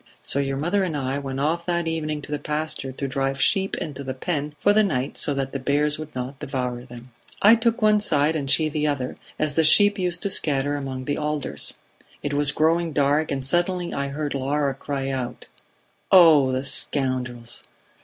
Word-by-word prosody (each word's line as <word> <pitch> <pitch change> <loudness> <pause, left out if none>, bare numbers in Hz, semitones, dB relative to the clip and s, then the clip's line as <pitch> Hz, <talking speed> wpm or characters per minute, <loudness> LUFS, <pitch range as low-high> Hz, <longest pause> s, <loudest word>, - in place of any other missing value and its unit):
So 140 - 0
your 135 -1 -1
mother 175 +7 0
and 165 -5 -2
I 135 0 -2
went 135 -1 -5
off 165 +4 -1
that 170 -1 0
evening 155 -2 -3
to - - -9
the 150 - -2
pasture 150 -3 -2
to 135 +1 -4
drive 135 0 -1
the 135 - 0
sheep 195 0 +1
into 140 -3 -5
the 130 -1 -5
pen 150 0 -3
for 205 - +4
the 215 - +5
night 140 -10 -1
so 145 - 0
that 135 -1 -2
the 135 - -4
bears 145 +3 0
would 155 -2 -8
not 130 +2 -5
devour 125 -2 -3
them. 120 0 -12 0.3
"I 210 +3 +7
took 230 0 +1
one 215 0 +5
side 155 -6 +1
and 140 -3 -2
she 155 +3 +4
the 150 0 -1
other, 140 -4 -2 0.2
as 155 -1 0
the 160 - +2
sheep 205 +6 +6
used 180 -1 0
to 200 - -1
scatter 145 -4 +1
among 135 -2 -5
the 145 - -2
alders. 150 -1 -2 0.5
It 145 - -2
was 145 0 +3
growing 165 +1 +1
dark, 145 +2 +2
and 135 -2 -3
suddenly 175 +4 0
I 140 0 -2
heard 145 +1 -4
Laura 140 +1 0
cry 135 0 -4
out: 125 -2 -5 0.7
'Oh, 160 -8 +7
the 130 +1 -1
scoundrels!' 125 -4 -1
145 Hz, 205 wpm, -23 LUFS, 135-160 Hz, 0.7 s, I